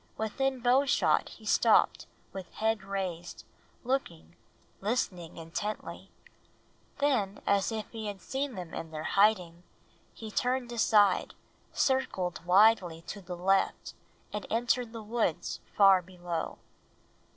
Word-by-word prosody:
Within 260 Hz, +4 st, -1 dB
bowshot 260 Hz, +3 st, +3 dB
he -, -, -14 dB
stopped -, -, +3 dB, 0.3 s
with 190 Hz, -2 st, -8 dB
head 220 Hz, -2 st, 0 dB
raised, 185 Hz, -3 st, -5 dB, 0.4 s
looking, 235 Hz, -11 st, -3 dB, 0.4 s
listening 190 Hz, -6 st, -2 dB
intently. 170 Hz, +6 st, -5 dB, 0.9 s
Then, 245 Hz, -9 st, +1 dB
as 200 Hz, +1 st, +2 dB
if 220 Hz, -1 st, -4 dB
he 220 Hz, -2 st, -5 dB
had 200 Hz, -1 st, -5 dB
seen 270 Hz, +2 st, -3 dB
them 180 Hz, -3 st, -7 dB
in 165 Hz, 0 st, -5 dB
their 155 Hz, -1 st, -6 dB
hiding, 180 Hz, -3 st, +2 dB, 0.5 s
he 220 Hz, -1 st, -9 dB
turned 250 Hz, +1 st, -1 dB
aside, 210 Hz, -4 st, +3 dB, 0.4 s
circled 190 Hz, -, 0 dB
widely 185 Hz, -4 st, +4 dB
to 200 Hz, +4 st, -7 dB
the 180 Hz, -1 st, -7 dB
left, 195 Hz, +2 st, +1 dB, 0.4 s
and 210 Hz, -, -4 dB
entered 240 Hz, +1 st, 0 dB
the 225 Hz, -1 st, -8 dB
woods 215 Hz, -6 st, -1 dB, 0.2 s
far 195 Hz, -2 st, +7 dB
below. 175 Hz, -2 st, -5 dB
205 Hz, 120 wpm, -30 LUFS, 180-235 Hz, 0.9 s, far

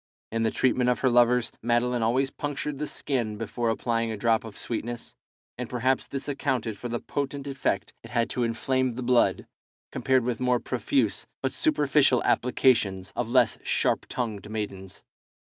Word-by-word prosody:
In 115 Hz, 0 st, -1 dB
the 110 Hz, -, +3 dB
treatment 125 Hz, +1 st, +2 dB
of 125 Hz, -, +1 dB
her 130 Hz, -, +3 dB
lovers, 120 Hz, 0 st, +4 dB
Madeline 120 Hz, +1 st, +1 dB
always 130 Hz, +4 st, +1 dB
punctured 145 Hz, -1 st, -4 dB
the 150 Hz, -, -2 dB
skin 120 Hz, -9 st, -2 dB
before 115 Hz, +2 st, -2 dB
applying 115 Hz, 0 st, 0 dB
a 110 Hz, -, -4 dB
drop 115 Hz, +1 st, +2 dB
of 110 Hz, -3 st, -9 dB
sweetness, 120 Hz, 0 st, -4 dB, 0.5 s
and 125 Hz, -, -4 dB
perhaps 130 Hz, +2 st, 0 dB
this 135 Hz, 0 st, -5 dB
accounted 130 Hz, -6 st, -1 dB
for 120 Hz, +5 st, -6 dB
the 120 Hz, 0 st, -2 dB
potent 140 Hz, 0 st, -4 dB
effect 135 Hz, -8 st, -2 dB
it 115 Hz, -, -11 dB
had 120 Hz, -1 st, +1 dB
to 125 Hz, -, -2 dB
inflame 125 Hz, +2 st, 0 dB
the 130 Hz, -, -4 dB
blood, 120 Hz, 0 st, +3 dB, 0.5 s
compared 130 Hz, -2 st, +2 dB
with 120 Hz, -1 st, -2 dB
more 125 Hz, -1 st, +2 dB
profuse 200 Hz, -, 0 dB, 0.2 s
but -, -, +1 dB
superficial 145 Hz, -, +3 dB
applications 110 Hz, -7 st, +2 dB
of 120 Hz, -2 st, -2 dB
less 125 Hz, -1 st, +3 dB
sharp -, -, +1 dB
tongued 110 Hz, -4 st, -3 dB
maidens. 100 Hz, -3 st, -5 dB
120 Hz, 165 wpm, -27 LUFS, 115-130 Hz, 0.5 s, lovers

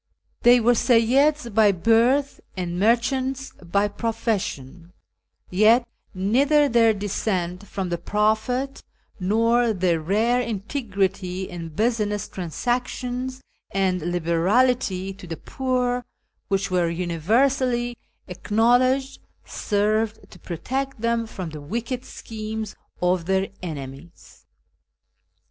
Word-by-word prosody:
They 245 Hz, +1 st, +7 dB
were 240 Hz, +1 st, +4 dB
Seyyids 250 Hz, +3 st, +3 dB
by 215 Hz, -1 st, +5 dB
birth, 230 Hz, +9 st, +2 dB, 0.2 s
and 175 Hz, -1 st, -3 dB
merchants 260 Hz, +5 st, +1 dB
by 200 Hz, +4 st, +1 dB
profession; 190 Hz, -, -3 dB, 0.6 s
yet 220 Hz, +6 st, +4 dB, 0.3 s
neither 275 Hz, +10 st, +3 dB
their 230 Hz, -3 st, +4 dB
descent 195 Hz, -2 st, -2 dB
from 190 Hz, -2 st, -4 dB
the 170 Hz, -1 st, -2 dB
Prophet, 220 Hz, +8 st, 0 dB, 0.4 s
nor 230 Hz, +4 st, +2 dB
their 180 Hz, -4 st, +1 dB
rare 220 Hz, +9 st, +2 dB
integrity 195 Hz, -5 st, -2 dB
in 170 Hz, -2 st, -7 dB
business 210 Hz, +2 st, -1 dB
transac 240 Hz, +8 st, -2 dB
tions 255 Hz, +1 st, -5 dB, 0.3 s
and 190 Hz, -2 st, 0 dB
liberality 185 Hz, +5 st, +1 dB
to 185 Hz, -2 st, -12 dB
the 165 Hz, -1 st, -5 dB
poor, 250 Hz, -1 st, -1 dB, 0.4 s
which 195 Hz, 0 st, -1 dB
were 175 Hz, -2 st, +2 dB
universally 240 Hz, -, +1 dB, 0.3 s
acknowledged, 245 Hz, +8 st, +1 dB, 0.2 s
served 215 Hz, +1 st, -1 dB
to -, -, -14 dB
protect 260 Hz, -, -4 dB
them 230 Hz, 0 st, 0 dB
from 185 Hz, -6 st, -6 dB
the 155 Hz, -1 st, -8 dB
wicked 235 Hz, -, -4 dB
schemes 220 Hz, -1 st, -6 dB, 0.3 s
of 180 Hz, -1 st, +2 dB
their 190 Hz, 0 st, +1 dB
enemies. 150 Hz, -1 st, -9 dB
215 Hz, 105 wpm, -23 LUFS, 185-245 Hz, 0.6 s, They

